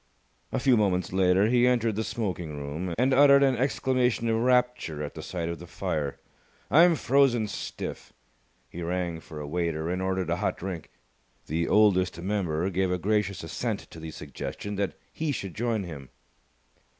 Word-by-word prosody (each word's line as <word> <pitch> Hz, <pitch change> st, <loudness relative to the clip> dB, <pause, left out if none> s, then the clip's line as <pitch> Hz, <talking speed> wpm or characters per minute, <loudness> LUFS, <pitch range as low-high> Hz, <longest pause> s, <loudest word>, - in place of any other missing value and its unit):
A -, -, -1 dB
few 130 Hz, -1 st, +4 dB
moments 95 Hz, -3 st, +1 dB
later 95 Hz, +1 st, +4 dB
he 120 Hz, +2 st, +4 dB
entered 115 Hz, -3 st, +2 dB
the 110 Hz, -, -1 dB
smoking 90 Hz, -10 st, -3 dB
room, 80 Hz, +5 st, -4 dB
and 130 Hz, +3 st, +3 dB
uttered 140 Hz, 0 st, +7 dB
an 135 Hz, -2 st, +3 dB
exclamation 125 Hz, -2 st, +1 dB
of 110 Hz, -, +2 dB
rapture 125 Hz, -11 st, +1 dB
at 75 Hz, -, -5 dB
the 80 Hz, -, -7 dB
sight 85 Hz, +1 st, -4 dB
of 85 Hz, 0 st, -4 dB
the 85 Hz, -, -10 dB
fire. 75 Hz, -3 st, -3 dB, 0.5 s
"I'm 170 Hz, +2 st, +7 dB
frozen 130 Hz, -4 st, +3 dB
stiff!" 105 Hz, -, -6 dB, 0.6 s
He 85 Hz, -, -8 dB
rang 85 Hz, -1 st, -2 dB
for 80 Hz, -1 st, -10 dB
a 75 Hz, -, -5 dB
waiter 85 Hz, +1 st, -2 dB
and 90 Hz, +1 st, -2 dB
ordered 95 Hz, -2 st, -1 dB
a 85 Hz, -, +1 dB
hot 105 Hz, -, -1 dB
drink. 90 Hz, -3 st, -6 dB, 0.6 s
The 85 Hz, +2 st, -1 dB
Oldest 95 Hz, -5 st, +3 dB
Member 90 Hz, -2 st, -1 dB
gave 95 Hz, +1 st, +1 dB
a 90 Hz, -, 0 dB
gracious 100 Hz, -1 st, 0 dB
assent 80 Hz, -, -3 dB
to 80 Hz, -, -10 dB
the 80 Hz, 0 st, -7 dB
suggestion 75 Hz, +7 st, -6 dB
that 100 Hz, -1 st, -1 dB, 0.2 s
he 155 Hz, -2 st, -1 dB
should 100 Hz, -9 st, -4 dB
join 115 Hz, -2 st, -1 dB
him. 70 Hz, -7 st, -8 dB
95 Hz, 175 wpm, -27 LUFS, 85-120 Hz, 0.6 s, uttered